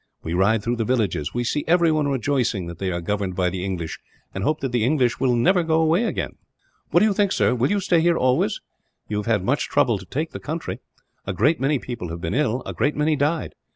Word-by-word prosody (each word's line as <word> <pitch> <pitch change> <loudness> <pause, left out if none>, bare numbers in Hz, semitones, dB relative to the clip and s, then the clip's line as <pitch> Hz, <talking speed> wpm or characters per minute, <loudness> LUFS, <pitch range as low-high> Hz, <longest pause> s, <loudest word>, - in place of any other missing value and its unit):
We 80 - -3
ride 100 +4 +2
through 120 +2 -1
the 115 - 0
villages; 105 - -1
we 120 - 0
see 145 +5 -1
everyone 160 -3 +3
rejoicing 125 -7 0
that 85 0 -8
they 95 -1 -1
are 85 0 -3
governed 100 0 -2
by 90 -1 +1
the 90 0 -4
English, 90 -4 -4 0.3
and 95 - -4
hoping 155 +8 0
that 135 -2 -2
the 120 -3 +1
English 125 -2 +1
will 125 -2 +2
never 175 +10 +3
go 160 -1 +1
away 165 +8 +3
again. - - -3 0.5
"What - - +4
do - - +5
you 215 - +2
think, 200 -1 +1
sir - - +2
will 125 +1 +1
you 205 +1 +1
stay 175 -3 +2
here 170 0 +3
always? 125 -3 +1 0.5
You 105 - -2
have 105 - -3
had 105 -5 +2
much 135 +8 0
trouble 115 -5 +2
to 95 - -11
take 155 +4 -3
the - - -7
country. 160 +2 -5 0.5
A 95 - -1
great 145 - +2
many 140 +2 +2
people 120 -9 -6
have 85 +1 -5
been 80 -1 -3
ill; 130 -3 0
a - - -5
great 140 +6 0
many 150 +1 +2
died. 150 +3 -1
125 Hz, 245 wpm, -23 LUFS, 100-155 Hz, 0.5 s, do